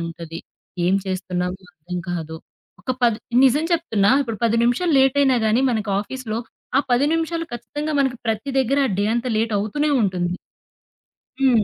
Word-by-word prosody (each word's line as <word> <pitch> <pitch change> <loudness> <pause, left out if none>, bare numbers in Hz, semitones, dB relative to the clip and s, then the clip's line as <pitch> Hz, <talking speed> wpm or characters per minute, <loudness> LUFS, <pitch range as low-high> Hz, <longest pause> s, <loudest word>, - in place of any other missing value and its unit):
ఉంటది. 165 0 -6 0.5
ఏం 185 - +3
చేస్తున్నామో 185 -1 -2
అర్థం 175 +3 -6
కాదు. 160 -2 -4 0.5
ఒక 230 - -3
పది 230 -3 +3 0.3
నిజం 275 +4 +3
చెప్తున్న 225 -13 +1 0.2
ఒక 230 - -4
10 230 0 +2
నిమిషాలు 275 +8 +1
లేటయినా 270 -1 +4
గాని, 225 +4 +3
మన 220 -3 0 0.2
ఆఫీస్‌లో 225 0 -5 0.4
ఆ - - +5
10 245 +3 +4
నిమిషాలు 330 0 -1
ఖచ్చితంగా 290 +7 -4
మనకి 265 -2 +1
ప్రతి 225 +5 -1
దగ్గర, 265 +2 +1
ఆ - - -2
డే 205 - +2
అంతా 240 +1 -1
లేటవుతూనే 220 +7 0
ఉంటుంది. 180 -2 -1 1.1
హ్మ్. 250 -5 +4
230 Hz, 150 wpm, -22 LUFS, 190-270 Hz, 1.1 s, ఆ